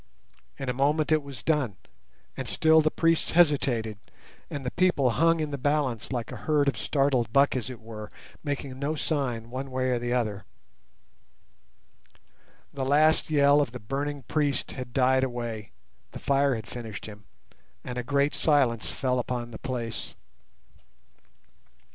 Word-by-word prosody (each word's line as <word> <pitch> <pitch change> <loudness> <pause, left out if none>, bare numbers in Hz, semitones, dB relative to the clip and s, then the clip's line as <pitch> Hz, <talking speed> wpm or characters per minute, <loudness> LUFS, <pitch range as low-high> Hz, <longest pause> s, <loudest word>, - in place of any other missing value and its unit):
In 135 - -5
a 125 - 0
moment 150 +4 +1
it 155 -1 +4
was 140 -5 -10
done, 145 - +1 0.6
and - - -5
still 160 0 +4
the 155 - +2
priests 165 +1 +1
hesitated, 130 - +2 0.5
and 140 -2 -5
the 125 - -1
people 175 -9 +2
hung 165 +6 +3
in 155 -1 -2
the 140 - -4
balance 140 -5 0
like 120 -3 -3
a 125 - -6
herd 145 +7 +1
of 140 - +2
startled 135 -5 +1
buck 140 +2 +4
as 130 -1 -2
it 125 -3 -8
were, 110 -1 -9 0.3
making 140 -3 -4
no 145 +3 -1
sign 125 -7 -2
one 135 +2 -4
way 130 0 0
or 125 - +1
the 120 0 -3
other. 110 -5 -1 2.3
The 135 - -3
last 155 +5 +3
yell 145 -1 +5
of 125 -5 -2
the 125 - -6
burning 140 +5 -3
priest 145 -1 -1
had 125 -2 -7
died 130 +1 +3
away, 120 -5 -4 0.4
the - - -6
fire 140 -1 +2
had 110 -2 -6
finished 115 -4 -7
him, 105 -2 -11 0.6
and 125 -1 -4
a - - -3
great 140 +3 +1
silence 130 -7 +2
fell 130 -1 0
upon 120 -1 -3
the 110 - -8
place. 120 -3 -4
130 Hz, 160 wpm, -27 LUFS, 120-145 Hz, 2.3 s, yell